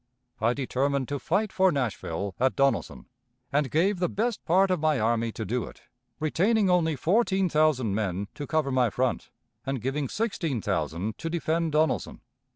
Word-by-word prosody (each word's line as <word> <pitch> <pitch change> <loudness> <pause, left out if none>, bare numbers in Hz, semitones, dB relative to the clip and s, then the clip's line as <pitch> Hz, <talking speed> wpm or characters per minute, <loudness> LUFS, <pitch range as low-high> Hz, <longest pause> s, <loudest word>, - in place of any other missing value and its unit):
I 115 +3 +2
determined 140 0 -1
to 145 -1 -2
fight 195 - 0
for 190 0 +4
Nashville 100 - -2
at 130 +1 +2
Donelson, 140 -1 0 0.5
and 145 -1 +2
gave 180 +6 +1
the 180 -2 +1
best 230 +2 -2
part 185 +3 +3
of 180 - +1
my 155 -3 +2
army 115 +1 +1
to 110 - -5
do 120 +5 -1
it, - - -13 0.4
retaining 190 +6 +2
only 165 -3 +2
fourteen 190 - +2
thousand 150 -9 +2
men 100 -2 -2
to 145 - -6
cover 155 -3 0
my 130 -2 +3
front, 125 +4 -1 0.3
and 135 -1 -2
giving 135 +3 -2
sixteen 185 - -2
thousand 95 +1 -2
to 165 - -3
defend 165 -1 -1
Donelson. 155 +1 0
145 Hz, 165 wpm, -27 LUFS, 120-175 Hz, 0.5 s, for